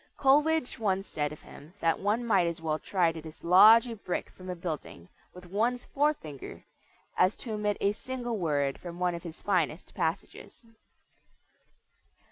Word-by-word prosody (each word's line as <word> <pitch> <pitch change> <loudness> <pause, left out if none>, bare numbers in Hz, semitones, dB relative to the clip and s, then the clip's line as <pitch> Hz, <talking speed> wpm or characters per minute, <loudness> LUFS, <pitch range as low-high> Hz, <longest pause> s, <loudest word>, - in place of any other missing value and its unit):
Coleridge 295 0 +3
once 195 -3 0
said 150 -5 -2
of 150 - -11
him 155 +6 -14
that 165 0 +1
one 215 +5 0
might 195 -6 +3
as 170 -1 -3
well 155 -1 -2
try 180 -4 +1
to 160 -1 -8
dislodge 185 +9 +6
a 235 -2 -6
brick 190 -4 -4
from 185 0 -11
a 180 - -3
building 155 - -6 0.2
with 180 0 -13
one's 225 +7 -1
forefinger 275 - -2 0.5
as 185 - +3
to 230 - -6
omit 210 -1 -1
a 200 - +2
single 240 0 -4
word 145 -5 0
from 175 -1 -8
one 180 0 0
of 170 - -5
his 165 -1 -10
finest 175 -4 -1
passages. 200 +6 -4
185 Hz, 160 wpm, -29 LUFS, 165-225 Hz, 0.5 s, dislodge